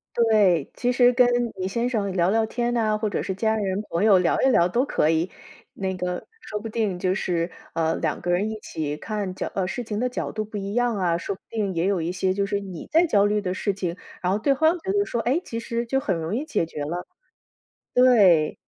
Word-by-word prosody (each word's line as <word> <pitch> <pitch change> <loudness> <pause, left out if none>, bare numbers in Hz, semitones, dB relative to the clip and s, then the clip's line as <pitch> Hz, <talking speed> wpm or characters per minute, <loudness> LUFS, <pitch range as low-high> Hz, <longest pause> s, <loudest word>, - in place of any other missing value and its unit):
对， 210 -9 +3
其 245 0 0
实 245 0 +5
跟 250 0 +4 0.3
你 185 - -1
先 235 +5 -1
生 205 -5 -1
聊 175 0 +2
聊 220 +1 +2
天 240 +2 -2
哪， 215 -2 +2
或 215 0 -1
者 - - -2
是 190 - -2
家 220 +3 0
人、 200 -1 -1
朋 170 +5 0
友 200 -4 +6
聊 180 - +1
一 - - +5
聊 175 -8 +4
都 245 +8 +1
可 155 - +1
以。 165 +3 +1 0.4
那 190 -1 -3
个 180 0 -4
说 210 -1 -5
不 225 +1 -6
定 210 -5 -1
就 185 +1 +1
是， 175 -4 -1 0.2
呃， 165 0 +1
2 - - -2
个 175 - -4
人 180 +4 +2
一 215 - -6
起 150 -6 -4
看 205 +1 -4
角 - - -4
呃， 190 -2 0
事 215 +6 -4
情 215 -1 -4
的 250 - +1
角 250 - -4
度 215 -1 -3
不 215 - -11
一 200 +2 -4
样 245 -2 +2
啊， 175 -3 +1
说 195 - -3
不 - - -15
定 205 -4 -2
也 170 +3 0
有 195 -3 +1
一 165 +2 -2
些 185 0 0
就 200 +1 0
是 200 0 -1
你 190 -4 -8
在 330 +2 +4
焦 205 -7 +4
虑 210 0 +1
的 185 -1 -2
事 200 0 -1
情， 180 -2 -4 0.2
然 180 0 0
后 200 - +2
对方 290 +8 +2
觉 385 +3 -3
得 405 0 +2
说， 235 - -3
诶， 275 +9 +1
其 230 - -5
实 230 +1 -2
就 270 +2 +1
很 195 -9 -1
容 165 +5 -3
易 285 +5 -2
解 300 - 0
决 150 -3 -5
了， 175 +4 -4 0.9
对。 200 -11 +5
200 Hz, 265 characters per minute, -24 LUFS, 180-230 Hz, 0.9 s, 友